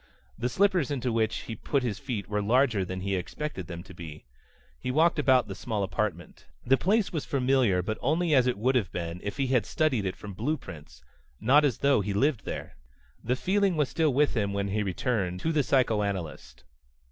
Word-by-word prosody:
The 120 +3 -2
slippers 185 +1 +2
into 130 -4 -1
which 115 -1 0
he 115 - -6
put 135 +5 -1
his 115 -5 -2
feet 120 -9 -4
were 105 0 -1
larger 115 -1 +2
than 95 0 -5
he 100 +1 -3
had 95 - +1
expected 95 - -5
them 85 -1 -7
to 95 - -13
be. 80 -4 -10 0.5
He - - -4
walked 160 +5 +3
about 130 -5 +4
the 100 - -5
small 105 0 -3
apartment. 95 -3 -3 0.2
The 130 - +5
place 200 - +1
was 155 -4 -2
familiar, 125 -9 +2
but 110 +4 -3
only 160 +4 +1
as 130 -3 +5
it 125 - 0
would 125 +6 +1
have 110 -9 0
been 85 0 -4
if 100 - -5
he 140 - +1
had 125 -4 +2
studied 130 -11 +1
it 95 - -3
from 100 -1 -9
blueprints, 105 - -5 0.4
not 135 +8 +5
as 140 -6 +1
though 140 -6 +3
he 100 +1 -2
lived 135 +2 +1
there. - - -6 0.5
The 125 +3 +1
feeling 190 +4 +1
was 150 -3 +1
still 160 -3 +1
with 145 +3 +2
him 100 -4 -1
when 100 0 -1
he 105 +2 0
returned 95 -2 -1
to 165 - 0
the 155 -2 +2
psychoanalyst. 100 - -1
120 Hz, 205 wpm, -28 LUFS, 100-140 Hz, 0.5 s, The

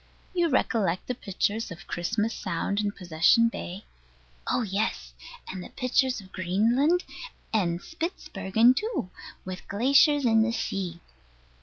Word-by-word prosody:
You 345 -2 +2
recollect 210 - +1
the 250 - -2
pictures 215 +1 -2
of 170 -2 -10
Christmas 215 +6 -1
Sound 190 +2 -2
and 205 -1 -1
Possession 180 +6 +4
Bay? 195 -2 -7 0.6
Oh 250 - +1
yes, 205 +1 -2 0.3
and 185 -1 -6
pictures 255 0 +1
of 190 -2 -14
Greenland 235 - +2 0.5
and 175 -6 +1
Spitzbergen 230 - +1
too, 425 - -2 0.3
with 185 -1 -7
glaciers 275 +6 +4
in 225 -2 +5
the 230 +1 +1
sea. 185 -6 -3
215 Hz, 125 wpm, -27 LUFS, 185-250 Hz, 0.6 s, in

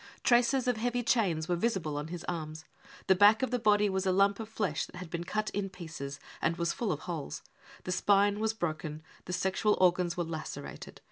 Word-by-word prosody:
Traces 245 +2 +3
of 250 -2 +2
heavy 245 +2 -1
chains 180 -10 +1
were 175 - +1
visible 175 -6 -1
on 145 +1 -3
Ms 175 0 -6
arms. 160 -1 -4 0.4
The 190 - +6
back 205 +5 +6
of 260 - 0
the 250 - +1
body 210 -2 +4
was 190 -1 -1
a - - +4
lump 195 +2 +3
of 220 -1 -6
flesh 200 -9 -1
that - - -15
had 180 -2 -8
been 170 0 -3
cut 215 +3 -2
in 200 -1 -2
pieces 160 -6 -7 0.2
and 165 +1 +1
was 170 0 0
full 230 -4 -1
of 150 - -3
holes. 165 -5 -5 0.4
The 185 - -4
spine 205 +2 +3
was 220 0 0
broken. 155 -4 -4 0.2
The 180 - -5
sexual 190 +3 +1
organs 180 -1 +3
were 175 - +1
lacerated. 160 -1 -7
185 Hz, 210 wpm, -31 LUFS, 165-215 Hz, 0.4 s, The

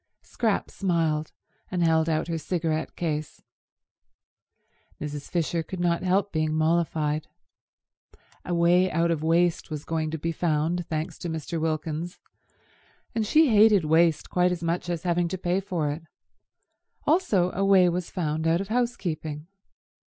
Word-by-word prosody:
Scrap 225 -4 -1
smiled, 165 -5 0 0.4
and 180 -2 0
held 160 0 +3
out 155 0 0
her 165 -1 -2
cigarette 160 0 -2
case. 155 -3 -3 1.6
Mrs. 145 -1 -6
Fisher 170 -1 0
could 180 +3 -7
not 175 -1 +1
help 190 +2 +1
being 155 -1 0
mollified. 155 -2 0 1.2
A 175 - -2
way 175 +2 +4
out 170 +1 +1
of 160 -3 -1
waste 170 +2 +1
was 150 -2 -5
going 160 -1 -1
to 160 - -3
be 165 +2 -2
found, 165 +1 0
thanks 155 0 -4
to 175 - -4
Mr. 160 0 -4
Wilkins, 160 +2 -2 1.0
and 220 -2 -1
she 310 +4 +5
hated 210 -5 +5
waste 160 0 +3
quite 180 0 +3
as 175 -1 -3
much 170 +1 -1
as 170 -2 -3
having 175 -1 +1
to 190 +2 -4
pay 180 +1 0
for 175 -7 -2
it; 150 +3 -5 1.0
also 215 - +2
a 195 - -1
way 195 -2 +5
was 175 0 -2
found 160 -3 -2
out 165 +1 +3
of 195 +1 -5
housekeeping. 170 -11 -2
170 Hz, 150 wpm, -26 LUFS, 155-180 Hz, 1.6 s, she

